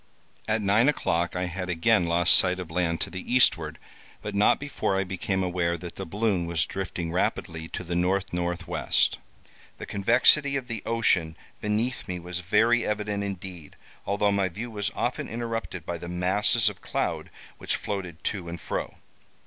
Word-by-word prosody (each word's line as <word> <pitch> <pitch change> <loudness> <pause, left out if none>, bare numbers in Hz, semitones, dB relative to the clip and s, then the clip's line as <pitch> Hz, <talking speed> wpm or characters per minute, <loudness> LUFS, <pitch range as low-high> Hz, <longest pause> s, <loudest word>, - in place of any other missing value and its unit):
At 110 0 +1
nine 105 +7 +4
o'clock 85 - 0
I 90 - -1
had 90 +1 -4
again 90 +2 +3
lost 85 +1 +4
sight 90 -1 +5
of 90 -3 -7
land 85 -1 0
to - - -1
the 95 - -5
eastward, 125 0 +3 0.5
but - - -4
not 100 +1 +4
before 140 -8 -1
I 95 - +2
became 95 0 -2
aware 85 -1 0
that 85 0 -8
the 95 - -6
balloon 100 -2 0
was 85 -2 +1
drifting 90 -3 -4
rapidly 80 -2 -1
to 90 - -5
the 90 - -10
N. 90 +1 +2
N. 95 +2 +3 0.2
W. 90 0 -2 0.9
The - - -6
convexity 125 +8 +4
of 130 -3 -2
the 115 -2 -4
ocean 90 -9 +2 0.2
beneath 110 +5 -1
me 90 - -3
was 90 +1 -5
very 115 +6 +3
evident 105 -1 -1
indeed, 90 -5 -7 0.3
although 100 0 +2
my 100 -2 +1
view 115 +7 -6
was 105 -2 -1
often - - -1
interrupted 115 -7 -4
by 85 0 -4
the 85 - -7
masses 100 +6 +2
of 105 - -1
cloud - - -2 0.3
which - - -1
floated 90 -5 -5
to 90 -4 -2
and 85 0 -6
fro. - - -4
95 Hz, 175 wpm, -27 LUFS, 85-105 Hz, 0.9 s, sight